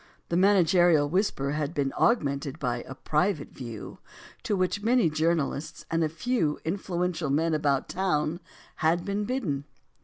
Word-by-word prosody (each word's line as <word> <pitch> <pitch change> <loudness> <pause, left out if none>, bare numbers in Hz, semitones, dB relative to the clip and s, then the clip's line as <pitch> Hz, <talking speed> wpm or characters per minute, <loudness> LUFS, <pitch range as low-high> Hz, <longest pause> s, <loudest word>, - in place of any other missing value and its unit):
The 170 - 0
managerial 175 -5 +4
whisper 150 -5 0
had 150 +1 -2
been 140 -2 0
augmented 140 - +1
by 120 -3 -2
a 135 - -7
"private 155 +2 0
view," 120 -5 -8 0.4
to 210 - -1
which 185 +2 0
many 230 -6 +3
journalists 155 -1 -1
and 165 0 +2
a 155 - +1
few 165 -2 0
influential 175 -2 -2
men 160 +4 +1
about 145 -3 +1
town 170 -3 0 0.4
had 165 +2 +1
been 205 +1 -1
bidden. 185 - -2
165 Hz, 145 wpm, -27 LUFS, 145-185 Hz, 0.4 s, managerial